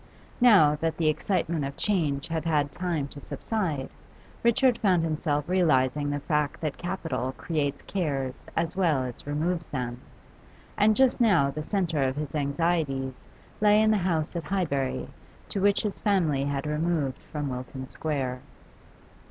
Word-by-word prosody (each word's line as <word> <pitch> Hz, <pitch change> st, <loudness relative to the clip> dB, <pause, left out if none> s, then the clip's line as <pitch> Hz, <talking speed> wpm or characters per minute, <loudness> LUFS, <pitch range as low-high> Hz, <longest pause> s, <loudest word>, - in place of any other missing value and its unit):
Now 185 Hz, -12 st, +6 dB
that 160 Hz, 0 st, -1 dB
the 160 Hz, -2 st, +3 dB
excitement 165 Hz, 0 st, 0 dB
of 140 Hz, 0 st, -5 dB
change 155 Hz, -9 st, 0 dB
had 165 Hz, -1 st, -2 dB
had 150 Hz, -3 st, +1 dB
time 170 Hz, -4 st, -2 dB
to 145 Hz, -, -9 dB
subside, 165 Hz, -12 st, -3 dB, 0.5 s
Richard 235 Hz, +1 st, +3 dB
found 185 Hz, -5 st, +3 dB
himself 150 Hz, -2 st, -1 dB
realising 145 Hz, -6 st, +2 dB
the 145 Hz, 0 st, -1 dB
fact 150 Hz, -1 st, 0 dB
that 155 Hz, -3 st, -3 dB
capital 175 Hz, -7 st, -3 dB
creates 145 Hz, -4 st, -2 dB
cares 140 Hz, -9 st, -2 dB, 0.2 s
as 165 Hz, +1 st, -1 dB
well 165 Hz, -8 st, +2 dB
as 125 Hz, +2 st, -7 dB
removes 165 Hz, +3 st, -1 dB
them, 125 Hz, -2 st, -4 dB, 0.7 s
and 215 Hz, +1 st, +4 dB
just 260 Hz, 0 st, +3 dB
now 170 Hz, -12 st, +4 dB
the 155 Hz, +2 st, -5 dB
centre 170 Hz, -5 st, 0 dB
of 130 Hz, 0 st, +1 dB
his 150 Hz, -2 st, -4 dB
anxieties 140 Hz, -2 st, 0 dB, 0.5 s
lay 210 Hz, 0 st, +6 dB
in 220 Hz, 0 st, +4 dB
the 215 Hz, -, +3 dB
house 170 Hz, -4 st, -1 dB
at 170 Hz, -3 st, -3 dB
Highbury 150 Hz, -9 st, -1 dB, 0.4 s
to 195 Hz, -, -2 dB
which 200 Hz, 0 st, +3 dB
his 210 Hz, -2 st, -3 dB
family 165 Hz, -10 st, +2 dB
had 140 Hz, 0 st, -2 dB
removed 150 Hz, -3 st, -1 dB
from 145 Hz, -2 st, -2 dB
Wilton 130 Hz, +1 st, -6 dB
Square. 130 Hz, -3 st, -3 dB
155 Hz, 150 wpm, -27 LUFS, 140-180 Hz, 0.7 s, Now